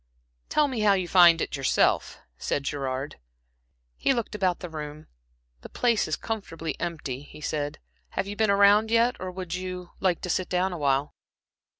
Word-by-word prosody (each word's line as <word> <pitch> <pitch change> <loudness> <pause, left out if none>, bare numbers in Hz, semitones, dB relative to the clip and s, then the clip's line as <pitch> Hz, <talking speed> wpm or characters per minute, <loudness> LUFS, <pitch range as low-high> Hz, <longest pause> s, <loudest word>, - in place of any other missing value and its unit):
"Tell 300 -1 +3
me 255 -4 -3
how 210 -1 +5
you 185 -2 0
find 170 -2 +7
it - - -2
yourself," 135 -2 +1 0.2
said 140 - -1
Gerard. 135 - -3 0.8
He 270 - +2
looked 235 -2 -3
about 185 -4 0
the 180 - -6
room. 155 -1 -7 0.6
"The - - -10
place 235 -3 +1
is 155 - 0
comfortably 165 -9 -5
empty," 155 -6 -4
he 145 - -13
said. 145 -1 -3 0.4
"Have - - +1
you 200 +1 -6
been 220 0 +2
around 200 +2 +5
yet, 235 +2 +3
or 185 - -4
would 180 -2 -6
you 180 -1 -5
a - - -21
like 180 -3 +2
to 180 - -5
sit 185 - -1
down 180 +1 0
awhile?" 140 -3 0
180 Hz, 180 wpm, -26 LUFS, 150-200 Hz, 0.8 s, find